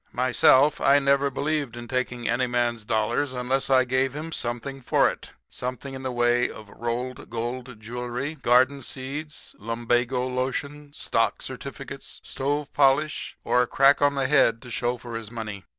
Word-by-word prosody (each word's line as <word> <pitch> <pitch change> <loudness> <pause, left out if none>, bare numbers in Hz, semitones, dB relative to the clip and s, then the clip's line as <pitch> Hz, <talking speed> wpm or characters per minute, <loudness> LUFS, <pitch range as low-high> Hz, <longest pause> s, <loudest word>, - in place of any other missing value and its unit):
"Myself, 130 +3 +4
I 140 +1 +6
never 140 0 +3
believed 140 -3 -2
in 120 0 -7
taking 125 -1 -2
any 125 0 +1
man's 120 -2 -1
dollars 115 +6 0
unless 130 +2 -1
I 130 -1 +5
gave 130 +1 +1
him 160 +2 -5
something 130 +1 -3
for - - +3
it - - -11 0.2
something 130 +2 -5
in 130 - -6
the 130 -1 -3
way 120 0 +2
of 105 -2 -11
rolled 120 +2 -4
gold 120 +1 -5
jewelry, 125 +5 -4
garden 130 0 +3
seeds, 140 +4 -5
lumbago 120 +2 0
lotion, 140 +3 -3
stock - - 0
certificates, - - -7
stove 145 +2 -2
polish 145 +2 +2
or 125 - +3
a 125 - +1
crack 140 +3 +4
on 145 0 +3
the 135 -2 +1
head 130 -5 +4
to 125 - -10
show 120 +1 -1
for 120 -1 -8
his 115 -2 -5
money. 110 -4 -6
130 Hz, 165 wpm, -25 LUFS, 120-140 Hz, 0.2 s, I